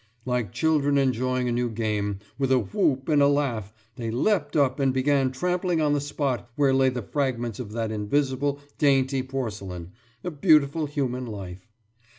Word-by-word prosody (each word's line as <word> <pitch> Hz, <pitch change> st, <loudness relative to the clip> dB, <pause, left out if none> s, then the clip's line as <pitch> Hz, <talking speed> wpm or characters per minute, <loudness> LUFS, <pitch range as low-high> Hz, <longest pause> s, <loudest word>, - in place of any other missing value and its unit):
« 115 Hz, 0 st, -38 dB
Like 125 Hz, -6 st, -1 dB
children 145 Hz, -3 st, +2 dB
enjoying 130 Hz, -1 st, +1 dB
a -, -, 0 dB
new 120 Hz, 0 st, 0 dB
game, 105 Hz, -3 st, -2 dB, 0.2 s
with 135 Hz, -1 st, +1 dB
a 130 Hz, -, +5 dB
whoop 130 Hz, +5 st, 0 dB
and 150 Hz, -3 st, +3 dB
a 140 Hz, -, +6 dB
laugh, 130 Hz, -8 st, 0 dB, 0.3 s
they 115 Hz, -2 st, -3 dB
leapt 145 Hz, -, 0 dB
up 140 Hz, -2 st, +2 dB
and 135 Hz, -1 st, +3 dB
began 135 Hz, 0 st, +2 dB
trampling 180 Hz, +4 st, 0 dB
on 150 Hz, -2 st, +2 dB
the 145 Hz, -, +1 dB
spot 140 Hz, -4 st, -2 dB
where 140 Hz, -2 st, +3 dB
lay 135 Hz, 0 st, +4 dB
the 125 Hz, -2 st, -4 dB
fragments 120 Hz, -4 st, -2 dB
of 115 Hz, -5 st, -6 dB
that 115 Hz, -1 st, -2 dB
invisible 135 Hz, +6 st, 0 dB, 0.2 s
dainty 135 Hz, -2 st, +3 dB
porcelain, 105 Hz, -10 st, -5 dB, 0.3 s
a 180 Hz, -, -3 dB
beautiful 155 Hz, -1 st, +3 dB
human 130 Hz, -3 st, -2 dB
life. 95 Hz, -3 st, -8 dB
130 Hz, 170 wpm, -25 LUFS, 115-145 Hz, 0.3 s, a